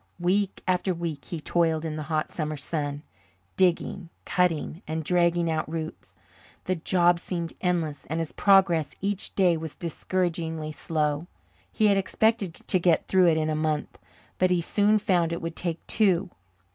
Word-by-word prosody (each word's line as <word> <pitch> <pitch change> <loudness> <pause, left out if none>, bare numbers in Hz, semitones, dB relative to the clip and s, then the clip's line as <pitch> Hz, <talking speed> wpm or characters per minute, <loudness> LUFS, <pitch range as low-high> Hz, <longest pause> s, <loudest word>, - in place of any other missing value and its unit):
Week 190 +3 0
after 185 0 +1
week 160 -6 -4
he 170 - -5
toiled 165 0 +1
in 155 -1 -3
the 155 - -4
hot 155 -1 -1
summer 155 -2 -3
sun, 145 0 -3 0.5
digging, 180 -1 +1 0.2
cutting, 175 -1 0
and 160 +1 -2
dragging 170 0 +2
out 160 -1 -1
roots. 160 - -6 0.5
The 185 - 0
job 175 +1 +3
seemed 170 -2 -4
endless, 165 -6 -1
and 160 - -2
his 165 -2 -2
progress 190 -6 +3
each 200 0 -3
day 180 -4 +4
was 160 -2 -6
discouragingly 165 -2 -2
slow. 150 0 -1 0.4
He 215 - +1
had 200 -1 +5
expected 195 -1 +1
to 185 - -1
get 170 -2 +2
through 185 -2 +4
in 160 -2 +2
a 155 - 0
month, 155 -1 -2 0.4
but 185 - +4
he 180 -1 +2
soon 205 +5 +3
found 175 -5 +1
it 170 - -3
would 165 0 -4
take 170 -2 -3
two. 195 -3 +2
170 Hz, 160 wpm, -26 LUFS, 155-185 Hz, 0.5 s, had